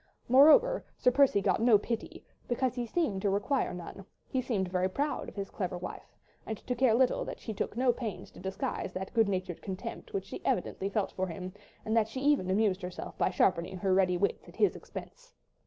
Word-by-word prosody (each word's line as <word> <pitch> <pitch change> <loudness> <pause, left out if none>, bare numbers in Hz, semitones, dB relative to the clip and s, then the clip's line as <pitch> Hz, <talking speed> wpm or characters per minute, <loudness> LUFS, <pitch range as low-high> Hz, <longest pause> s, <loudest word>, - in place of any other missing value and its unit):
Moreover, 315 - +6
Sir 250 - +4
Percy 265 -6 +4
got - - +2
no 230 -2 +6
pity, 230 +2 -5 0.2
because 250 0 0
he 245 -2 -3
seemed 220 - 0
to 200 - +1
require 205 +7 0
none—he 190 +8 -6
seemed 215 -7 -1
very 185 +1 0
proud 290 +9 -2
of - - -16
his 200 -1 -5
clever 180 -2 -3
wife, 180 - -8 0.3
and 220 - -4
to 250 - -3
care 240 -2 +4
little 255 +1 +3
that - - -6
she 220 - -5
took 210 - -3
no 250 -1 +3
pains 220 -7 -6
to - - -14
disguise 190 0 -3
that 190 +1 -5
good 225 -3 +3
natured 185 -3 -3
contempt 190 -1 -6
which 195 -1 -3
she - - -8
evidently 190 +2 -1
felt 200 0 -1
for 190 0 -2
him, 180 +2 -6 0.3
and 220 - 0
that 220 -2 +3
she 240 +4 -6
even 280 -9 +2
amused 200 -1 +2
herself 180 0 -6
by - - +3
sharpening 185 0 +1
her 190 +1 +1
ready 185 -1 +3
wits 200 +3 -1
at - - -15
his 415 - +3
expense. - - -10
205 Hz, 205 wpm, -30 LUFS, 190-250 Hz, 0.3 s, Moreover